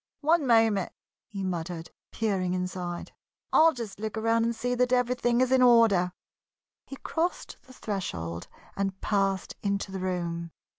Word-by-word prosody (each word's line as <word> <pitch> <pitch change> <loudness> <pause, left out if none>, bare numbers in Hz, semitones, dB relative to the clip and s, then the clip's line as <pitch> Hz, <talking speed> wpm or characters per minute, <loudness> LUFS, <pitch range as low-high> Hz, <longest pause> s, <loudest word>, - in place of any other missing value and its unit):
"One 315 -1 +3
moment!" 225 -5 +3 0.4
he 200 -4 -6
muttered, 170 -2 -4 0.2
peering 190 -5 -1
inside. 180 -1 -4 0.4
"I'll 325 +1 +7
just 230 -8 -7
look 220 +1 -4
around 225 +1 +2
and 235 0 -1
see 245 +2 -1
that 250 0 +1
everything 250 -1 +2
is 255 0 +2
in 260 -1 +5
order." 225 -7 +5 0.8
He 275 - -7
crossed 335 +5 -3
the 255 - -14
threshold 90 - -4 0.3
and 195 -1 -2
passed 195 -2 0
into 200 -1 -2
the 190 - -4
room. 170 -2 -3
205 Hz, 145 wpm, -28 LUFS, 185-245 Hz, 0.8 s, I'll